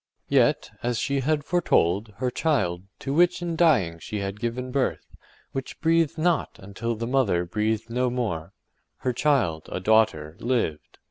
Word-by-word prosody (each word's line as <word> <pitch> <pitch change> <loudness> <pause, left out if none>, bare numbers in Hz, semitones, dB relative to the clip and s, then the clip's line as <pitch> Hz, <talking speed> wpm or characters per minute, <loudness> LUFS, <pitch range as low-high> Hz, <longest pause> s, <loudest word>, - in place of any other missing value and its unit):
Yet, - - +3
as 120 -1 -1
she 140 +3 0
had 150 +2 0
foretold, 105 - +1
her 125 +1 -1
child, 95 - 0 0.2
to 135 - -2
which 175 +2 +3
in 170 -1 -2
dying 120 - +3
she 105 - -5
had 100 0 -4
given 125 +3 -3
birth, 135 -1 -1 0.5
which 135 -1 -6
breathed 165 -1 +2
not 170 +1 0
until 110 +4 -4
the 115 +2 -4
mother 115 -9 +1
breathed 110 +4 -1
no 125 +2 0
more, 105 -10 -3 0.5
her 125 - +2
child, 120 - +1
a - - -2
daughter, 90 -7 +2
lived. 115 -11 -2
120 Hz, 155 wpm, -25 LUFS, 100-140 Hz, 0.5 s, Yet